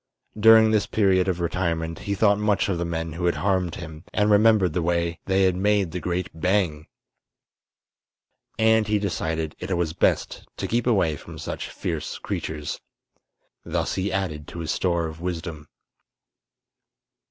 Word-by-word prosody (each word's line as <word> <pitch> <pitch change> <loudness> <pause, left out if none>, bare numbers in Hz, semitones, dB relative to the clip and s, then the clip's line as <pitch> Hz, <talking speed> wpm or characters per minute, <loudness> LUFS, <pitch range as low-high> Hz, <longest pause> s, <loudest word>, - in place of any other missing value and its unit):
During 110 0 +7
this 105 -2 +2
period 95 -4 +2
of 90 -2 0
retirement 85 -2 -2
he 100 - +1
thought 100 0 +3
much 105 -1 +1
of 90 -3 -1
the 85 - -1
men 80 -1 -3
who 90 +2 -3
had 85 - +2
harmed 95 -4 0
him, 80 0 -9
and 105 0 +2
remembered 105 -4 +4
the 90 - 0
way 85 0 0
they 95 0 +3
had 95 -1 +3
made 100 -2 +1
the 90 - -3
great 90 0 -2
"bang!" 80 -2 0 1.7
And 110 -1 +3
he 105 0 +2
decided 80 -5 -2
it 90 - -2
was 85 -2 -1
best 85 - 0
to - - -3
keep 120 +2 0
away 90 -10 +2
from - - -11
such - - -5
fierce 80 -4 -4
creatures. 75 -1 -4 0.8
Thus - - -2
he 95 +1 -1
added 90 -6 -3
to 85 - -7
his 80 - -2
store 85 -2 0
of 80 0 -7
wisdom. 85 -4 -5
90 Hz, 160 wpm, -24 LUFS, 80-100 Hz, 1.7 s, During